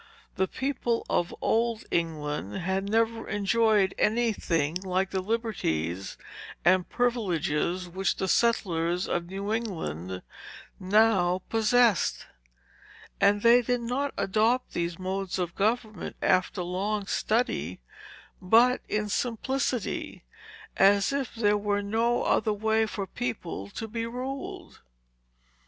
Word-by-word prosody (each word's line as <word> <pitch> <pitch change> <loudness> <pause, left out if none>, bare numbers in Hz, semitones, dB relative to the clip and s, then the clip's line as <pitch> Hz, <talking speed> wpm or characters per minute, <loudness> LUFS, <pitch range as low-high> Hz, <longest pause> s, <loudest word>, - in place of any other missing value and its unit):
The 190 0 +1
people 250 -1 -2
of 175 - +1
old 230 0 +1
England 150 - -2
had 190 +2 -2
never 225 +1 0
enjoyed 205 -1 +2
any 230 +1 +2
thing 160 -6 0
like 185 0 -1
the 190 - -1
liberties 95 - -2 0.5
and 185 0 +4
privileges, 180 -7 0
which 190 +2 -1
the 190 - -2
settlers 180 -6 +1
of 170 0 -2
New 200 +3 -3
England 95 - -4 0.6
now 185 -2 +3
possessed. 225 -2 +3 0.9
And 205 +1 +3
they 235 +1 +7
did 245 0 -1
not 265 +4 -1
adopt 225 +6 +1
these 170 0 -2
modes 190 -1 -3
of 175 -2 -2
government 215 -1 -1
after 185 0 +1
long 195 +4 -2
study, 195 - -1 0.6
but 235 +7 +4
in 210 0 0
simplicity, 245 +2 -2 0.5
as 200 +5 +4
if 275 -4 -3
there 210 -2 +2
were 205 0 0
no 230 +4 +1
other 215 - +2
way 220 +1 +1
for 200 -2 -4
people 190 - -5
to 225 - -6
be 230 +1 -3
ruled. 260 +3 -6
205 Hz, 115 wpm, -27 LUFS, 180-230 Hz, 0.9 s, they